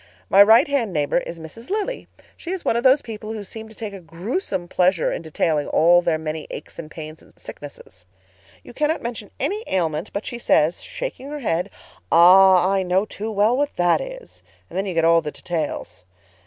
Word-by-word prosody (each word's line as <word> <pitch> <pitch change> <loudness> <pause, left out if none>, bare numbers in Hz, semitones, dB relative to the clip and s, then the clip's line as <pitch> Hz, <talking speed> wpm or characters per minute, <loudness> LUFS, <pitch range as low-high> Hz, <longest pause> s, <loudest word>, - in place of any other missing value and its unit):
My 195 - +8
right 220 +3 +7
hand 255 -9 -1
neighbor 150 +1 +1
is 170 -1 -8
Mrs. 165 +9 -11
Lilly. 430 +5 -3 0.3
She 340 - -10
is 370 -1 -4
one - - +2
of 235 - 0
those 265 +2 +5
people 220 -1 -7
who 215 -2 -6
seem 220 +2 -9
to 220 - -15
take 215 -2 -6
a 195 - -8
gruesome 180 - -4
pleasure 180 -1 +2
in - - -4
detailing 155 -2 -1
all 175 +2 +4
their 170 -2 0
many 155 0 -5
aches 155 - -9
and 155 -2 -7
pains 155 0 -9
and - - -22
sicknesses. 140 -10 -11 0.6
You - - -13
cannot 300 +4 -1
mention 235 0 -5
any 425 +3 -1
ailment 165 -3 -1
but 200 - -4
she 240 - -5
says, 160 -7 +2
shaking - - -6
her 295 0 -6
head, 180 -3 -1 0.4
'Ah, 185 +1 +7
I 195 0 +1
know 185 +2 +1
too 215 +1 -6
well 215 +3 +2
what 290 +2 -1
that 175 0 +2
is'—and - - -12
then 195 +2 -1
you 185 - -4
get 165 0 +2
all 165 0 +5
the 150 - -4
details. 145 - -5
190 Hz, 200 wpm, -22 LUFS, 165-235 Hz, 0.6 s, My